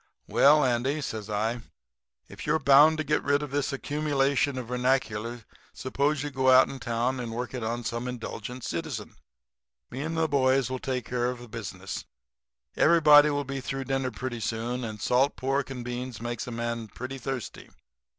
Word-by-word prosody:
"'Well, 150 0 +5
Andy,' 130 +4 0
says 110 -6 -5
I, 110 +3 -1 0.7
'if - - -9
you - - +3
are - - +1
bound 145 +3 +6
to 155 - -1
get 150 0 +1
rid 145 +1 +1
of 145 - -6
this 145 0 0
accumulation 140 -1 0
of 125 -3 -5
vernacular 120 -2 -1 0.3
suppose 140 +2 0
you 145 - -4
go 130 -1 +2
out 130 0 +7
in 135 - -7
town 120 +2 -1
and 120 -2 -4
work 125 +3 -4
it 125 -3 -4
on 120 +2 -2
some 115 +2 -3
indulgent 125 0 -6
citizen. 140 -10 -4 0.8
Me 130 - -5
and 160 +2 -3
the 160 0 +2
boys 130 -3 +2
will 130 - -2
take 125 -3 -3
care 120 0 -1
of 125 - -4
the 120 0 -11
business. 95 -4 -6 0.7
Everybody 150 -2 +7
will 145 -1 -1
be 135 0 -5
through 135 +1 -4
dinner 135 -1 -1
pretty 125 -2 -5
soon, 115 +3 -2
and 110 -2 -5
salt 130 +6 +2
pork 135 +1 -1
and 125 -3 -6
beans 125 -1 -5
makes 120 0 -4
a - - -5
man 115 -1 -3
pretty 130 +5 -7
thirsty. 130 -2 -5
130 Hz, 185 wpm, -27 LUFS, 120-140 Hz, 0.8 s, out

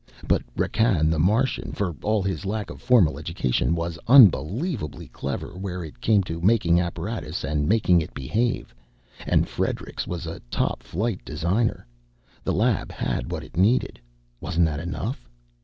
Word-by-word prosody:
But - - +3 0.2
Rakkan 90 -9 +2
the 80 - 0
Martian, 110 - +1
for 90 -6 -2
all 105 -1 +1
his 95 +1 -2
lack 105 +2 -3
of - - -11
formal 85 - +4
education, 80 0 0
was 85 0 -3
unbelievably 115 - +4
clever 70 +5 -5
where 90 -1 -5
it 75 - -12
came 105 -3 +3
to 85 -2 -5
making 90 -4 +4
apparatus 85 0 -4
and 75 +2 -1
making 95 -5 +4
it 80 - -6
behave, 115 - -1 0.5
and - - +3
Friedrichs - - -3
was 90 -1 -4
a 80 - -6
top - - -1
flight 95 - -3
designer. 95 - -1 0.6
The - - 0
lab - - +1
had - - -3
what - - -4
it - - -14
needed 105 +8 +2 0.4
wasn't 85 -1 +1
that 75 -2 -2
enough? 90 - -5
90 Hz, 155 wpm, -24 LUFS, 80-110 Hz, 0.6 s, formal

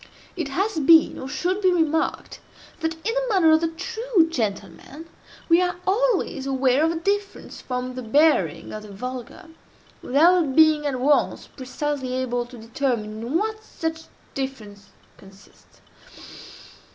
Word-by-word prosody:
'" - - -23
It 335 -6 -3
has 375 +6 -1
been, 320 +2 +5
or 260 - -6
should 360 +7 -2
be 375 -2 +4
remarked, 320 -2 -1 0.4
that, 325 0 -2
in 375 +8 -3
the - - 0
manner 365 -7 +4
of 315 0 +4
the 330 - +1
true 390 +2 0
gentleman, 225 - -5 0.4
we 335 +1 +5
are 360 0 0
always 390 - 0
aware 265 +1 +2
of 325 - +2
a - - -3
difference 400 +4 -3
from 255 0 -4
the 255 - -6
bearing 240 - +2
of 215 - -6
the 210 -1 -12
vulgar, 255 - -8 0.5
without 315 +1 +3
being 310 -2 +5
at 260 -3 -2
once 285 +3 +1
precisely 265 0 -4
able 245 -2 -2
to 245 0 -12
determine 225 -2 -3
in 250 +8 -1
what 435 +2 -3
such 325 -5 -5 0.3
difference 215 -7 -6 0.3
consists. 195 0 -20
295 Hz, 150 wpm, -23 LUFS, 250-340 Hz, 0.5 s, been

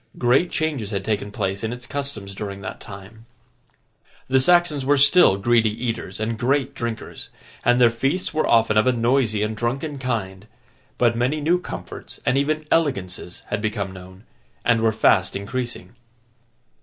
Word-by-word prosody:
Great 130 +8 +3
changes 150 -10 -2
had 100 -3 -3
taken 105 -1 -1
place 100 -2 -3
in 110 - -2
its 125 0 -6
customs 135 -9 -5
during 100 0 -6
that - - -7
time. 105 +3 -12 1.0
The 130 0 +3
Saxons 175 -1 +3
were 145 +2 +3
still 140 - +6
greedy 115 +2 +3
eaters 115 -3 -4
and 110 +1 -2
great 135 +2 +1
drinkers, 115 -1 -6 0.3
and 120 +1 +3
their 120 -2 +6
feasts 135 +11 -1
were 155 - +1
often 110 -2 +4
of 110 - +4
a 130 - +4
noisy 115 -3 +1
and 110 +1 -2
drunken 135 +6 -3
kind; 105 -6 -3 0.5
but 120 -1 +3
many 130 +6 0
new 170 +4 +2
comforts - - -8
and - - +2
even 155 +3 0
elegances 95 - -1
had 105 - -2
become 105 -3 -2
known, 95 +1 -12 0.4
and 115 -2 +3
were 115 -1 +3
fast 105 -3 +2
increasing. 115 -1 -5
115 Hz, 160 wpm, -22 LUFS, 105-135 Hz, 1.0 s, still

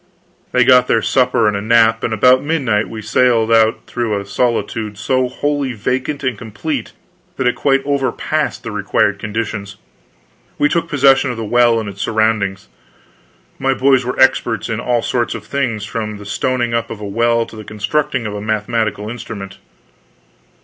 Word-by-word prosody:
They 125 - +4
got 125 0 +5
their 115 - +2
supper 125 -4 +2
and 105 - +1
a 100 - -2
nap, 115 +1 +3
and - - -1
about 125 +4 +4
midnight 130 -9 0
we 110 -1 -7
sallied 115 0 +2
out 110 -1 +4
through 115 -4 -2
a 100 - -7
solitude 105 -1 -2
so 130 +3 0
wholly 145 -1 -2
vacant 130 +6 -2
and 130 -3 0
complete 115 +5 -5 0.4
that 130 - -1
it 125 - +3
quite 135 -1 +1
overpassed 140 -2 -1
the - - -5
required - - 0
conditions. 105 -2 -4 0.8
We 145 - +3
took 170 0 -1
possession 135 -2 +4
of 120 - -4
the 115 - -4
well 120 +1 +3
and 110 - -5
its 100 0 -7
surroundings. 110 - 0 0.9
My 135 0 +1
boys 130 0 +3
were 125 +1 -4
experts 125 -3 +2
in 115 -1 -2
all 120 0 0
sorts 120 -2 -1
of - - -8
things, 115 -7 -2
from 110 -2 -4
the 105 - -11
stoning 120 +3 -1
up 115 0 -1
of 110 - -7
a 105 - -6
well 115 +2 +1
to - - -13
the 110 - -8
constructing 120 +5 -2
of 105 - -4
a 105 - -5
mathematical 110 0 -1
instrument. 105 -4 -7
115 Hz, 175 wpm, -17 LUFS, 110-130 Hz, 0.9 s, got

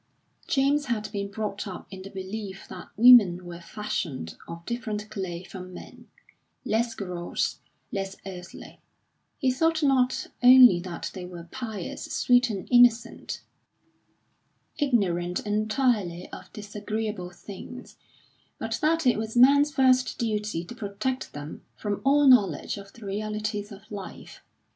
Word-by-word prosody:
James 285 +2 +2
had 215 -4 -2
been 200 -1 -3
brought 205 -1 -4
up 185 - -7
in 190 -1 -8
the 195 - -9
belief 195 0 -6
that - - -10
women 210 -7 +7
were 170 -1 -8
fashioned 165 - -4
of 170 0 -9
different 215 -3 -4
clay 180 -3 -4
from 185 -1 -9
men, - - -12 0.6
less 230 +1 0
gross, 180 -3 -3 0.3
less 195 -3 -3
earthly; 185 -1 -9 0.6
he 265 -4 +2
thought 325 +4 +1
not 260 -2 +2 0.2
only 250 -6 +9
that 175 -1 -6
they 185 - -7
were 175 -1 -9
pious, 220 -8 -5
sweet 245 0 +3
and 200 -4 -4
innocent, 240 -1 +3 1.4
ignorant 180 - +1
entirely 210 -4 0
of - - -10
disagreeable 210 -2 -4
things, 195 +7 -10 0.6
but - - -3
that 325 0 +2
it 245 -4 +3
was 220 +2 -4
man's 285 +4 +6
first 260 -2 +3
duty 210 -7 -2
to 175 - -9
protect 230 +4 -3
them 145 +1 -8
from 205 -2 -3
all 285 +2 +4
knowledge 205 - +4
of 200 0 -10
the 230 - -12
realities 210 +1 -3
of 200 0 -11
life. 200 -2 -9
210 Hz, 135 wpm, -26 LUFS, 190-245 Hz, 1.4 s, only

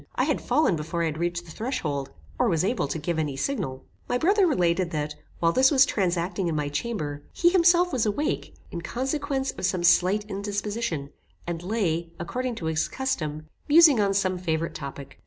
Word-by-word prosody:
I - - +2
had - - 0
fallen 305 - +2
before 165 +2 -3
I - - +2
had 155 -1 -3
reached 175 0 -2
the 165 - -11
threshold, 155 - -3 0.3
or - - +3
was 165 -1 +1
able 225 - 0
to 145 - -3
give 160 +1 -2
any 145 -4 -2
signal. 135 - -3 0.2
My 245 - +2
brother 385 +7 +3
related, 180 - +1
that 150 -2 -3 0.3
while 165 0 +3
this 260 +7 +5
was 275 -3 +6
transacting 180 -1 -1
in 165 - -1
my 150 -1 -1
chamber, 145 -3 -3
he 345 - +3
himself 355 -1 +4
was 235 -4 +1
awake, 250 +9 -2 0.2
in 170 - -5
consequence 270 - -2
of - - -4
some 180 -2 -1
slight 185 +4 +4
indisposition, 200 -6 -3 0.3
and 170 -1 -4
lay, 175 -4 -1
according 245 +8 -3
to 170 - -6
his 160 0 0
custom, 155 - -3 0.2
musing 305 -5 +7
on 195 -1 +1
some 185 -2 +1
favorite 165 -2 -1
topic. 140 -2 -8
180 Hz, 190 wpm, -26 LUFS, 160-250 Hz, 0.3 s, musing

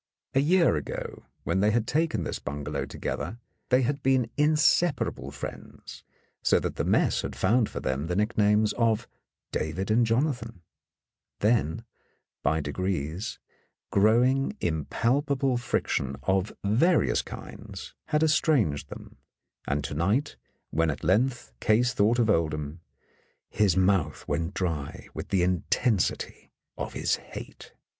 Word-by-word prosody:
A 135 - +3
year 170 - +4
ago, 75 - -6 0.2
when 95 - 0
they 105 +2 +4
had 115 +1 +1
taken 160 +4 0
this - - -4
bungalow 75 0 -4
together, 115 - -4 0.3
they 130 +1 +4
had 140 +3 -1
been 130 -3 +2
inseparable 150 - +2
friends, 70 - -9 0.4
so - - +3
that - - -4
the - - 0
mess - - +2
had - - -5
found 115 -1 +2
for - - -5
them 65 +4 -2
the 90 - -1
nicknames 105 0 +2
of 115 -2 +2 0.4
David 90 +7 -2
and 120 +2 +4
Jonathan; 115 - -1 0.7
then, 105 -4 +1 0.6
by 80 +3 +1
degrees, 85 +5 -3 0.5
growing 120 +6 +3
impalpable 130 - 0
friction 70 - -1
of 95 +1 +1
various 130 - +3
kinds - - -9
had 150 +1 +2
estranged 150 - +2
them, - - -11 0.5
and 70 +1 0
to 75 - -4
night, 100 - 0 0.4
when 80 0 +2
at 75 - -4
length 120 - +1
Case 115 +2 +3
thought 110 +4 +3
of 120 -3 +3
Oldham, 80 -4 0 0.7
his 100 -4 +2
mouth 95 -6 +1
went 80 +3 -2
dry 80 -6 -3
with - - -6
the 95 -3 +2
intensity 95 +4 0 0.3
of - - -5
his - - 0
hate. - - -10
105 Hz, 130 wpm, -27 LUFS, 80-125 Hz, 0.7 s, year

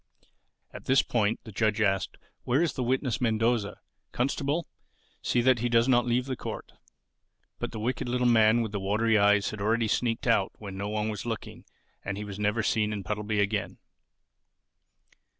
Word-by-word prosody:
At - - -10
this 135 +1 +4
point 110 -2 0
the 110 - -10
judge 110 +1 0
asked, 95 -3 0 0.3
"Where 135 +7 +2
is 170 - 0
the 130 - -4
witness 130 0 0
Mendoza? 115 -2 0 0.3
Constable, 140 +5 -1 0.5
see 120 - +1
that 130 0 +4
he 120 +2 0
does 115 +1 +3
not 120 -2 +3
leave 125 +1 +1
the 130 -1 -3
court." - - -7 0.9
But - - -3
the 110 - -6
wicked 120 +2 -2
little 125 0 0
man 115 -1 +5
with 110 - -4
the 105 - -3
watery 105 +3 +2
eyes 105 0 +3
had 110 -2 -7
already 115 +2 +1
sneaked 115 +2 0
out 115 -5 +2
when 100 -3 -8
no 100 +1 -4
one 105 0 -1
was 105 +2 -5
looking 115 -2 -6 0.4
and 100 0 -4
he 105 - -4
was 100 0 -7
never 105 +2 0
seen 105 -1 +1
in 105 -2 -4
Puddleby 105 +2 -2
again. 100 0 -1
110 Hz, 180 wpm, -28 LUFS, 105-120 Hz, 0.9 s, man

